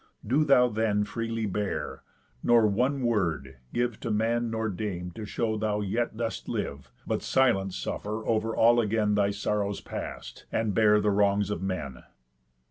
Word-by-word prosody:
Do 135 Hz, +8 st, +3 dB
thou 130 Hz, -4 st, +5 dB
then 105 Hz, -2 st, +1 dB
freely 115 Hz, +1 st, -3 dB
bear, 100 Hz, 0 st, -3 dB, 0.4 s
nor 120 Hz, -2 st, +5 dB
one 125 Hz, +6 st, +1 dB
word 85 Hz, -, 0 dB
give 120 Hz, -2 st, -1 dB
To -, -, -4 dB
man 115 Hz, +2 st, +1 dB
nor 110 Hz, 0 st, -1 dB
dame 90 Hz, -3 st, -4 dB
to 105 Hz, +5 st, -7 dB
show 110 Hz, 0 st, -1 dB
thou 105 Hz, -1 st, 0 dB
yet 110 Hz, +3 st, -1 dB
dost 115 Hz, -1 st, -3 dB
live, 70 Hz, -1 st, -4 dB, 0.2 s
But -, -, -1 dB
silent 95 Hz, -8 st, +2 dB
suffer 105 Hz, -, -4 dB
over 110 Hz, 0 st, 0 dB
all 120 Hz, +1 st, +5 dB
again 105 Hz, -1 st, +1 dB
Thy 100 Hz, -1 st, +3 dB
sorrows 100 Hz, 0 st, -1 dB
past, -, -, -7 dB
and 110 Hz, -2 st, 0 dB
bear 105 Hz, 0 st, +5 dB
the 105 Hz, 0 st, +2 dB
wrongs 100 Hz, 0 st, +2 dB
of 95 Hz, -, -3 dB
men." 90 Hz, -9 st, -4 dB
105 Hz, 160 wpm, -28 LUFS, 100-115 Hz, 0.4 s, thou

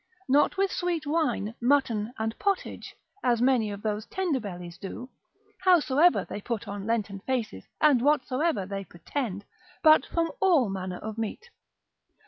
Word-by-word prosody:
Not 290 Hz, +7 st, +3 dB
with 390 Hz, -1 st, +2 dB
sweet 345 Hz, -3 st, -1 dB
wine, 285 Hz, -9 st, 0 dB
mutton 240 Hz, -4 st, +2 dB
and 220 Hz, +1 st, -2 dB
pottage, 400 Hz, -2 st, -2 dB, 0.3 s
as 240 Hz, -2 st, +2 dB
many 245 Hz, -3 st, +3 dB
of 205 Hz, 0 st, -7 dB
those 215 Hz, 0 st, -2 dB
tender 370 Hz, -9 st, -1 dB
bellies 180 Hz, -4 st, -8 dB
do, 245 Hz, +7 st, -7 dB, 0.5 s
howsoever 345 Hz, -2 st, +4 dB
they 205 Hz, -, -6 dB
put 225 Hz, -1 st, -4 dB
on 200 Hz, 0 st, -5 dB
Lenten 210 Hz, -4 st, -1 dB
faces, 225 Hz, -, -3 dB
and 290 Hz, -6 st, +5 dB
whatsoever 275 Hz, -, +1 dB
they 195 Hz, 0 st, -4 dB
pretend, 200 Hz, -, -5 dB, 0.4 s
but 310 Hz, -1 st, +6 dB
from 330 Hz, -1 st, 0 dB
all 330 Hz, -, +4 dB
manner 185 Hz, -1 st, -4 dB
of 220 Hz, +3 st, -6 dB
meat. 325 Hz, -, -5 dB
240 Hz, 145 wpm, -27 LUFS, 205-305 Hz, 0.5 s, but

